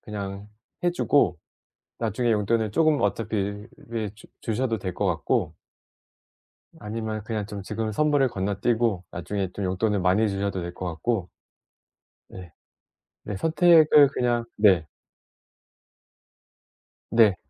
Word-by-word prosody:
그냥 100 -1 -6 0.3
해주고 170 - +2 0.6
나중에 115 +2 0
용돈을 110 +1 +1
쪼금 155 +4 +3
어차피 105 -2 -2 0.3
예 110 -3 -2
주 105 - -16
주셔도 115 0 -1
될 95 -2 -5
것 - - -2
같고 - - 0 1.3
아니면 110 0 -4
그냥 105 -2 -3
좀 105 -1 -7
지금 110 +2 -3
선물을 145 +3 +2
건너뛰고 100 0 0
나중에 95 +2 -3
좀 100 - -3
용돈을 100 +3 0
많이 95 +4 +3
주셔도 100 -1 -2
될 85 0 -6
것 90 - -6
같고. 90 +3 -2 1.0
네. 90 -3 -11 0.7
네. 105 - -4
선택을 160 - +6
그냥 120 -1 0
네. 95 -7 +4 2.2
네. 110 -5 +5
105 Hz, 225 characters per minute, -25 LUFS, 100-115 Hz, 2.2 s, 선택을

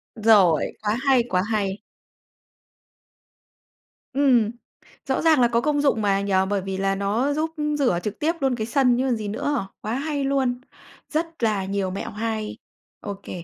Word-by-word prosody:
Rồi, 205 -8 +4 0.2
quá 215 +1 0
hay, 260 -3 +5
quá 180 0 +2
hay. 200 -2 0 2.4
Ừm, 250 -6 +3 0.5
rõ - - 0
ràng 315 -5 +4
là 240 - +6
có 235 0 +1
công 290 +1 +1
dụng 275 -6 +2
mà, 195 -1 +2
nhỉ? 200 0 -2 0.2
Bởi 200 -1 0
vì 190 0 -4
là 195 0 0
nó 215 +8 0
giúp 315 +2 -1 0.3
rửa 215 -11 +2
trực 210 -1 -4
tiếp 320 +3 +1
luôn 270 -3 +1
cái 220 -1 -3
sân 250 -1 +3
chứ 255 - +1
còn 245 - +2
gì 215 -2 -5
nữa. 225 +1 -2
Quá 215 - -3
hay 285 +2 -2
luôn, 265 -3 0 0.5
rất 325 -2 -3
là 210 -4 +1
nhiều 195 -1 -2
mẹo 195 - -5
hay. 220 0 -3 0.4
Ô 200 - -5
kê. 175 - -7
225 Hz, 175 wpm, -23 LUFS, 200-275 Hz, 2.4 s, là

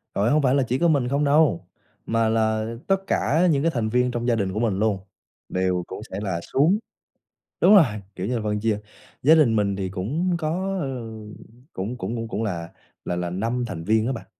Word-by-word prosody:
Trời, 105 +4 +2
hông 155 0 +4
phải 130 0 +3
là 135 - +3
chỉ 125 +2 -1
có 170 - +3
mình 140 -6 +2
không 140 +3 0
đâu, 145 - +3 0.4
mà 115 -1 +1
là 110 -1 +1 0.2
tất 195 0 0
cả 170 +5 +2
những 140 0 +1
cái 165 - +2
thành 115 -5 -1
viên 125 +1 +2
trong 120 0 -3
gia 120 - +3
đình 95 -3 -1
của 105 - -2
mình 105 -5 0
luôn, 105 -3 +1 0.5
đều 90 -1 0
cũng 95 - -7
sẽ - - -4
là 95 -5 -2
xuống 165 +10 +3 0.8
đúng 210 - +7
rồi, 180 -7 +8 0.3
kiểu 95 +3 -3
như 125 - -1
là, - - -3
phân 105 0 -1
chia, 110 -1 0 0.4
gia 155 +4 +7
đình 130 -8 +4
mình 100 -2 +1
thì 95 -1 -3
cũng 145 - -1
có, 185 +5 -2
ờ, 140 - -2 0.9
cũng 105 +7 -4
cũng 105 +5 -4
cũng 115 0 -4
cũng 115 0 -3
là 85 -5 -3 0.4
là 90 - -2
là 90 0 -2
5 115 +7 -2
thành 80 -7 -6
viên 110 +3 +2
á - - 0
bạn. 115 - -7
115 Hz, 225 wpm, -24 LUFS, 100-140 Hz, 0.9 s, rồi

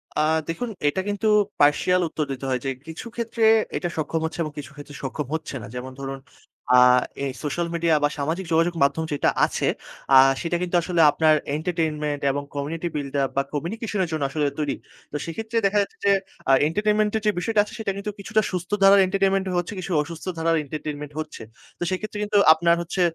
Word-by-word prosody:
আ - - 0 0.3
দেখুন 235 +9 -3 0.2
এটা 145 +6 +1
কিন্তু 205 +1 -1 0.3
partial 150 +5 +4
উত্তর 155 -1 -2
দিতে 135 0 -5
হয় 130 -1 0
যে - - 0 0.2
কিছু 160 +7 -7
ক্ষেত্রে 230 -1 -2 0.3
এটা 175 - -2
সক্ষম 160 +1 -1
হচ্ছে 160 +1 -5
এবং 155 - -5
কিছু 145 0 -7
ক্ষেত্রে 145 0 -11
সক্ষম 135 +1 -4
হচ্ছে 155 -3 -5
না। 105 - -8
যেমন 130 +1 -6
ধরুন 135 0 -5 0.6
আ - - +9 0.5
এই 135 - -2
সোশ্যাল 170 +3 -1
মিডিয়া 165 -1 +2
বা 145 - +4
সামাজিক 160 +6 -2
যোগাযোগ 165 +2 +3
মাধ্যম 140 +3 +1
যেটা 145 - +2 0.2
আছে, - - -2 0.5
আ - - +10 0.2
সেটা 175 0 -1
কিন্তু 180 0 -2
আসলে 170 0 +1
আপনার 155 0 +4 0.2
entertainment 155 -3 -2
এবং 145 +1 -3
community 160 +4 -3
buil 145 -2 -3 0.2
up 135 - 0
বা 140 - +5
communication 205 - -3
এর 175 - -3
জন্য 155 -3 -1
আসলে 150 +1 -1
তৈরি। 145 -2 -1 0.4
তো - - -7
সেক্ষেত্রে 220 +7 -4
দেখা 200 +1 +2
যাচ্ছে - - -12
যে 200 - +5 0.4
আ - - +6 0.2
entertainment 210 +4 +1
এর - - -4
যে 210 - +4
বিষয়টা 215 +3 0
আছে, - - -12
সেটা 215 -3 -1
কিন্তু 210 +1 -4
কিছুটা 215 +2 +1
সুস্থ 180 0 -4
ধারার 195 +1 +8
entertainment 195 0 +1
এ - - -2
হচ্ছে, 175 +3 -4
কিছু 185 0 -5
অসুস্থ 165 +3 -8
ধারার 165 0 +2
entertainment 150 0 -6
হচ্ছে। 155 -6 -6 0.4
তো - - -2
সেক্ষেত্রে 210 +3 -4
কিন্তু 210 0 +1 0.2
আপনার 170 +1 +3
হচ্ছে 175 +2 -3
165 Hz, 200 wpm, -24 LUFS, 150-195 Hz, 0.6 s, আ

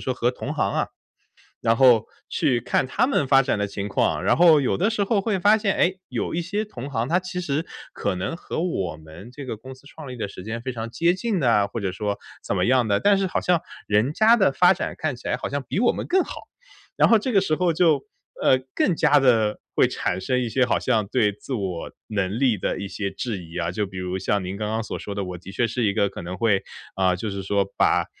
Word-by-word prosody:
说 130 - -1
和 120 0 +1
同 125 - -5
行 - - 0
啊， - - 0 0.7
然 115 - +3
后 120 -3 +5 0.2
去 125 -3 +1
看 130 - +1
他 225 - +1
们 160 - +1
发 135 0 +6
展 130 -4 -1
的 100 - 0
情 100 0 -5
况。 - - 0
然 - - +3
后 165 -4 +6
有 130 - 0
的 205 +5 +1
时 210 -2 0
候 200 +1 +1
会 195 -1 -1
发 205 +4 +5
现， 205 -3 0
诶， 185 +1 +1
有 - - -3
一 175 - 0
些 205 +5 -2
同 140 - -8
行， 115 -1 -1
他 175 +2 +3
其 180 0 -5
实 150 0 -2 0.3
可 100 - -2
能 95 - -3
和 165 - -4
我 95 - -2
们 80 +9 -12
这 140 0 -8
个 115 - -4
公 130 +4 -10
司 130 +2 -17
创 155 -2 -11
立 130 - -7
的 110 -4 -4
时 95 -2 -10
间 115 +2 -5
非 130 - -4
常 115 -1 -6
接 170 +5 +2
近 210 0 -1
的 125 -6 +2
啊， 105 -3 +4
或 105 +3 -5
者 95 -2 -1
说 100 +1 -3 0.2
怎 - - -2
么 - - +1
样 125 -2 +3
的， 100 -1 +2
但 200 -1 +4
是 195 - 0
好 185 - -1
像 175 -1 +2 0.3
人 105 +7 +2
家 220 +6 +5
的 190 -9 +4
发 180 +6 +5
展 - - -3
看 155 -4 -2
起 120 - -9
来 - - +1
好 - - -4
像 140 0 -3
比 190 - -1
我 245 - +4
们 - - -5
更 375 +1 +3
好。 - - -8 0.5
然 - - +5
后 225 - +7
这 250 +4 -2
个 195 -3 +4
时 155 -5 +1
候 175 -1 +1
就， 155 -5 +3 0.4
呃， 130 - +5 0.2
更 180 - +2
加 150 -2 +4
地 115 -5 +3
会 - - +4
产 95 - -2
生 125 +3 0
一 125 - -1
些 130 +3 +2
好 125 - +1
像 110 -3 0
对 105 -2 +2
自 105 +6 -8
我 95 -7 -3 0.2
能 100 0 -1
力 125 -6 +3
的 - - -2
一 100 - -4
些 100 0 -3
质 100 -4 -4
疑 85 +1 -9
啊， 85 -1 -1
就 100 +2 -2
比 95 - -10
如 90 0 -3
像 100 0 0
您 95 +2 -4
刚 105 +1 -3
刚 110 +1 -1
所 - - -5
说 100 - -6
的， 100 - -2
我 90 -1 -6
的 90 +3 -11
确 120 - +1
是 115 +2 -2
一 100 -2 +2
个 100 - +1
可 - - -8
能 90 +2 -6
会 105 -4 +2 0.3
呃， 95 -1 +2
就 105 +4 -4
是 100 0 -4
说 100 0 +1
把 - - +3
125 Hz, 285 characters per minute, -24 LUFS, 100-165 Hz, 0.7 s, 后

